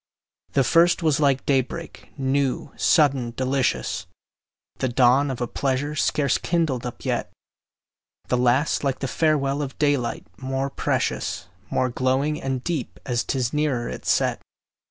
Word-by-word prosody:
The 135 - +4
first 170 +5 +4
was 155 -3 +2
like 140 -3 +2
day 135 -2 +4
break, 165 +6 -9
new, 135 -1 0
sudden, 135 -7 +2
delicious, 130 -1 0 0.7
The 130 - 0
dawn 130 +3 +4
of 130 -2 -4
a 120 - 0
pleasure 140 +3 -1
scarce 145 -1 +1
kindled 155 -8 0
up 120 - -9
yet; - - -1 1.0
The 125 - +1
last 125 +6 +2
like 135 -2 0
the 135 - -3
farewell 145 -1 +1
of 135 -2 -5
daylight, 145 -5 0
more 135 +1 -2
precious, 85 - -2 0.2
More 130 - +1
glowing 130 +5 0
and 135 -2 -2
deep, 165 -8 -3
as 120 -2 0
'tis 125 -3 -1
nearer 145 -6 0
its - - -5
set. - - +2
135 Hz, 145 wpm, -24 LUFS, 130-145 Hz, 1.0 s, The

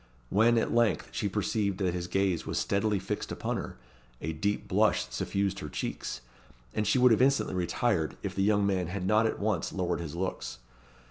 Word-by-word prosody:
When, 115 +4 +4
at 115 - +1
length, 115 -3 +2
she - - -1
perceived 100 -3 0
that 95 -3 0
his 90 -1 -3
gaze 95 -2 +1
was - - -3
steadily 100 +1 +1
fixed 95 - -4
upon - - -2
her, - - -6 0.4
a 80 +2 -3
deep 100 +7 -1
blush - - +3
suffused 100 +9 -1
her 75 - -6
cheeks, - - -4 0.5
and 105 - 0
she 130 - +3
would 125 -1 +6
have 115 - +4
instantly 135 -4 +3
retired, 90 -1 0
if - - -3
the 95 - -1
young 100 0 +3
man 95 -3 +1
had 90 +1 -4
not 110 +3 +4
at - - -2
once 105 -5 -1
lowered 90 -3 -1
his 85 -2 -5
looks. 65 -10 -3
100 Hz, 195 wpm, -29 LUFS, 90-105 Hz, 0.5 s, would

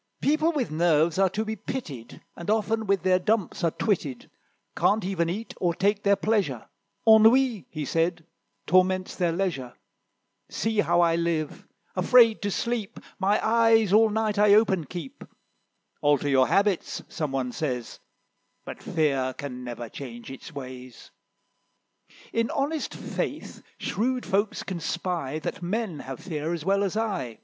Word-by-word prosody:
"People 310 +3 +2
with 280 - -2
nerves 160 +1 +2
are 195 -1 +4
to 215 +4 -2
be 220 0 -3
pitied, 170 - -7
And 170 - -7
often 220 0 0
with 195 -1 +1
their 185 -1 +3
dumps 205 -2 -1
are 165 - +4
twitted; 155 - -2 0.4
Can't 210 -2 +2
even 175 -3 0
eat, 215 +6 -5
or 175 -2 0
take 200 +3 +1
their 200 0 +4
pleasure; 195 - -1 0.4
Ennui," 220 - +5
he 155 -2 -5
said, 165 +3 0 0.4
"torments 185 0 +2
their 175 -2 +1
leisure. 165 -9 -2 0.7
See 220 -1 -1
how 175 -3 +3
I 165 -1 +3
live: 170 -3 -2 0.3
afraid 235 -3 +5
to 205 - -1
sleep, 230 +1 -3 0.2
My 200 +2 +2
eyes 225 -3 +4
all 220 +1 +6
night 215 -1 0
I 205 -1 +6
open 190 -6 +3
keep. 170 -7 -8 0.8
'Alter 145 0 +2
your 130 -1 +4
habits,' 200 -3 +1
some 155 -4 -3
one 130 -2 -2
says; 125 -5 -4 0.7
But - - -8
Fear 135 -5 0
can 125 -3 -6
never 120 -1 -6
change 120 0 -9
its 135 +5 -10
ways: 130 -3 -10 1.2
In 230 0 +1
honest 295 +2 -2
faith - - -5 0.2
shrewd 250 +4 -1
folks 200 +2 0
can 185 -3 -5
spy, 170 -3 -3
That 155 - -5
men 185 -2 -2
have 135 -2 -7
fear 160 -2 -3
as 160 -2 -7
well 200 +1 +2
as 200 +2 -2
I." 190 - -2
185 Hz, 150 wpm, -26 LUFS, 150-215 Hz, 1.2 s, all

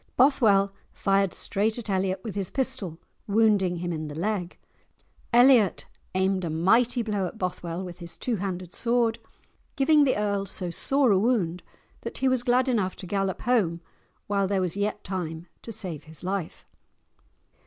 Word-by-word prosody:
Bothwell 215 -7 +4 0.2
fired 195 -1 +1
straight 215 +3 -1
at 235 - -6
Elliot 190 -1 -1
with 220 - -5
his 195 -3 -2
pistol, 260 - -1 0.3
wounding 205 -4 +3
him 175 0 -3
in 155 -1 -4
the 145 - -7
leg. 185 -1 -2 0.7
Elliot 240 -4 +5 0.3
aimed 190 0 +1
a 170 - -2
mighty 225 +10 +2
blow 205 -4 -1
at 220 - -9
Bothwell 175 -2 -3
with 180 -1 -8
his 170 -1 -8
two 240 -3 -1
handed 185 -2 -4
sword, 235 -1 +1 0.6
giving 295 +2 +4
the 265 -5 +2
earl 200 -1 -1
so 180 -2 -2
sore 270 - +2
a 190 - +4
wound 195 -7 +1 0.4
that - - -6
he 265 - +1
was 260 -2 +2
glad 250 +2 +2
enough 210 -7 0
to - - -9
gallop 195 0 -2
home 205 -9 +1 0.5
while 200 -1 0
there 195 0 0
was 180 -1 -1
yet 205 +1 -2
time 170 -3 -4 0.2
to 230 - -8
save 170 -8 -4
his 160 +2 -7
life. 185 -2 -4
195 Hz, 165 wpm, -26 LUFS, 180-230 Hz, 0.7 s, Elliot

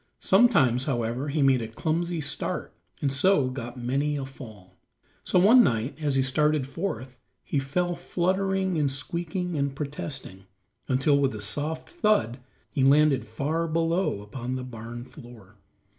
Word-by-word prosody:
Sometimes, 165 - +4
however, 120 0 -1
he 145 0 +1
made 135 -2 +4
a 115 - -4
clumsy 165 +8 -2
start 145 -1 -4 0.3
and 140 - +2
so 145 -2 +3
got 120 -1 -6
many 135 +5 -1
a 140 -2 -3
fall. 110 -8 -13 0.4
So - - +1
one 225 +7 +7
night 125 - -1
as 145 -3 0
he 135 - +3
started 150 +1 +2
forth 130 - -5 0.2
he 145 - -1
fell 175 +6 -1
fluttering 190 +1 0
and 140 -2 +1
squeaking 170 +6 -3
and 140 -2 -1
protesting, 135 -9 -6 0.4
until 135 +2 +3
with 135 -5 +1
a - - -6
soft 145 +10 -3
thud 210 - +1 0.3
he 135 - 0
landed 140 0 +4
far 155 +9 -1
below 165 - 0
upon 125 +4 -5
the 130 - -4
barn 120 0 -8
floor. 115 -6 -14
140 Hz, 150 wpm, -26 LUFS, 125-165 Hz, 0.4 s, one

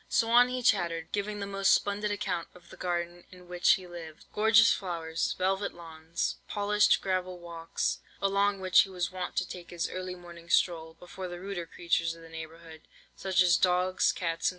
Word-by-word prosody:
"So 230 0 +2
on 245 +1 +7
he 250 0 -3
chattered, 170 -8 +1
giving 205 0 -2
the 200 - -3
most 195 0 +2
splendid 205 +1 +1
account 180 -4 -2
of 180 - -17
the - - -10
garden 175 0 -3
in 180 -1 -15
which 180 0 +4
he 190 -3 -3
lived. 165 -3 -10
Gorgeous 220 +1 +6
flowers, 165 -4 -2
velvet 190 +2 -1
lawns, 165 -1 -4
polished 210 0 +3
gravel 185 -1 -1
walks, 170 -1 -3 0.2
along 200 0 +1
which 185 -1 +5
he - - +4
was 180 -1 -3
wont 185 -1 -5
to 185 - 0
take 175 -1 -9
his 175 -1 -2
early 185 0 -5
morning 170 -1 -13
stroll, 160 -2 +1
before 180 +1 -8
the 175 0 -7
ruder 185 -2 -5
creatures 165 -1 -1
of 165 - -14
the 165 - -13
neighbourhood, 160 0 -10 0.3
such 185 -1 +2
as 175 -1 +4
dogs, 185 0 +2
cats, 165 -2 -2
&c. - - +5
180 Hz, 190 wpm, -29 LUFS, 170-195 Hz, 0.3 s, on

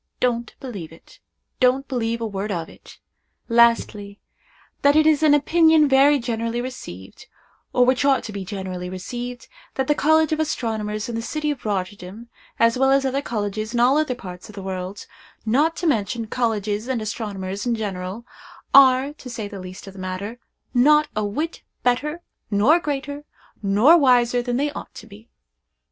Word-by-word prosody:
Don't 235 -2 -1
believe 200 -12 -7
it—don't 255 +10 -3
believe 230 -3 -2
a - - -1
word 205 0 -4
of 165 -4 -3
it. - - -16 0.5
Lastly. 230 -4 +2 0.6
That 285 +1 +4
it 310 0 +5
is 310 -1 +4
an 300 -2 +5
opinion 320 +1 +4
very 275 +2 +5
generally 230 -1 -2
received, 240 - -8 0.4
or 250 - +4
which 255 +2 +2
ought 275 -2 +3
to 215 - -6
be 200 -2 -5
generally 185 -2 -5
received, 240 +7 -6 0.3
that 265 - 0
the 295 - +3
College 315 +1 +3
of 310 - 0
Astronomers 220 -8 -2
in 240 - -5
the 230 - -2
city 300 +5 -2
of 270 -5 -7
Rotterdam, 200 +3 -4 0.3
as 230 +2 +3
well 270 0 +4
as 275 0 +3
other 270 +1 0
colleges 215 -1 -3
in - - +1
all 250 +3 +5
other 300 -5 0
parts 180 -5 -10
of 215 - -12
the 195 - -7
world,—not 205 - -3
to 350 - -5
mention 230 -5 0
colleges 215 -2 -1
and 260 -3 -1
astronomers 205 -2 -4
in 235 - +1
general,—are, 235 +7 +1
to 270 -4 -11
say 230 -3 -5
the 205 -1 -8
least 185 0 -9
of 195 - -10
the 195 - -12
matter, 185 +5 -5 0.3
not 300 +4 +4
a 215 - 0
whit 300 +12 -3 0.2
better, 300 +7 0 0.3
nor 225 +12 +4
greater, 285 -1 -4 0.4
nor 210 +11 +5
wiser 245 -3 +3
than 245 0 -2
they 290 +2 0
ought - - -9
to - - -10
be. 220 +1 -15
235 Hz, 170 wpm, -22 LUFS, 205-275 Hz, 0.6 s, it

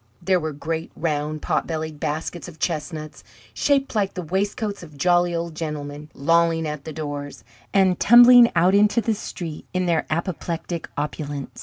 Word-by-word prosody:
There 185 +1 +2
were 155 -1 -3
great, 160 +3 -4
round, 155 -1 -2
potbellied 155 -2 -2
baskets 160 +3 -4
of 170 -3 -11
chestnuts, 155 -2 -4 0.3
shaped 275 - +1
like 200 -3 0
the 180 - -4
waistcoats 200 +4 -2
of 155 -4 -12
jolly 175 +2 +2
old 170 0 -3
gentlemen, 150 -2 -6
lolling 165 +2 +2
at 150 -2 -6
the 160 - -5
doors, 145 -2 -6 0.3
and 190 -2 +3
tumbling 240 +1 +8
out 175 +3 +4
into 210 +3 +4
the 225 -1 0
street 170 -6 -7
in 185 0 +1
their 170 -2 0
apoplectic 170 0 -3
opulence. 145 -1 -5
165 Hz, 155 wpm, -23 LUFS, 150-185 Hz, 0.3 s, tumbling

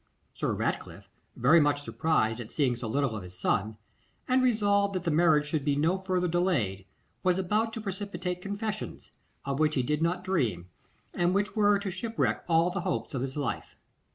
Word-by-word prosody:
Sir - - -1
Ratcliffe, - - -3 0.3
very 140 +8 +5
much 145 -1 +2
surprised 135 -9 0
at 115 -2 -7
seeing 135 -5 +1
so 120 -1 -5
little 135 0 0
of 105 - -4
his 90 0 -11
son, 105 +3 0 0.5
and 255 0 +3
resolved 205 -5 +2
that 185 - -2
the 170 - 0
marriage 155 -2 +4
should 150 -1 -1
be 145 -1 +1
no 165 +6 +1
further 185 -1 0
delayed, 155 - 0 0.4
was 180 -1 +2
about 210 +4 0
to 225 - -5
precipitate 195 -3 -4
confessions, 210 +2 -5 0.3
of 140 0 -2
which 155 0 +2
he 130 - +1
did 150 +4 -1
not 175 +2 0
dream, 115 - -1 0.4
and 175 +1 +1
which 205 +2 0
were 205 -1 +4
to 200 -1 -4
shipwreck 225 +5 -1
all 165 +2 +4
the 190 0 -2
hopes 180 -3 -2
of 130 - -2
his 135 +2 -4
life. 145 - -3
170 Hz, 185 wpm, -29 LUFS, 140-195 Hz, 0.5 s, very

